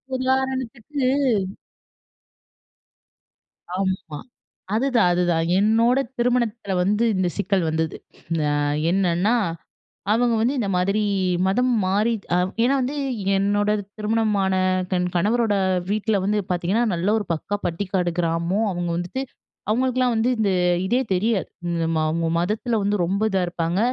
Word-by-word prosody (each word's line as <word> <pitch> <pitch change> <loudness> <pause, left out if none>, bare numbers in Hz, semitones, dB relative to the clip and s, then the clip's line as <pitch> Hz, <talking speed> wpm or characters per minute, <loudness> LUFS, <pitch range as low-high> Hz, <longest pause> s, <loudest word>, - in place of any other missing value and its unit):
உதாரணத்துக்கு 260 +1 -2 2.7
ஆமா, 185 -5 -2 0.6
அதுதான் 235 -5 +3
அதுதான் 175 -2 +1
என்னோட 230 +5 +3 0.2
திருமணத்துல 235 -4 0
வந்து 210 +4 +1
இந்த 185 -1 +1
சிக்கல் 190 -2 +1
வந்தது. 160 0 -2 0.5
அ - - +1 0.4
என்னன்னா, 190 +3 +2 0.8
அவங்க 240 0 +2
வந்து 255 +5 +1
இந்த 200 -4 -1
மாதிரி 195 +4 +1 0.5
மதம் 250 +6 +2
மாறிட் 210 +3 0 0.4
ஏனா 265 +3 +3
வந்து, 270 +4 -2 0.4
என்னோட 205 +1 +1 0.3
திருமணமான 210 -3 +1 0.4
தன் 180 0 +1
கணவரோட 215 +3 +2 0.4
வீட்ல 210 -2 0
வந்து 210 +1 +1
பாத்தீங்கன்னா, 185 +7 +1
நல்ல 175 +3 -2
ஒரு 205 - -6
பக்கா 205 +6 -3
பட்டிக்காடு 180 0 -1
கிராமம், 170 +6 0
அவங்க 175 -1 -3
வந்துட்டு 180 +10 -3 0.5
அவங்களுக்கெல்லாம் 250 +1 +1
வந்து 225 +3 +2
இந்த 200 -3 +2 0.4
இதே 245 +5 +2
தெரியாது. 205 +2 0 0.4
இம்ம 165 -1 0
அவங்க 165 +1 -1
மதத்துல 215 +6 -1
வந்து 205 +1 +1
ரொம்ப 200 +4 -1
இதா 190 - +1
இருப்பாங்க. 170 +2 -1
205 Hz, 115 wpm, -23 LUFS, 180-235 Hz, 2.7 s, அதுதான்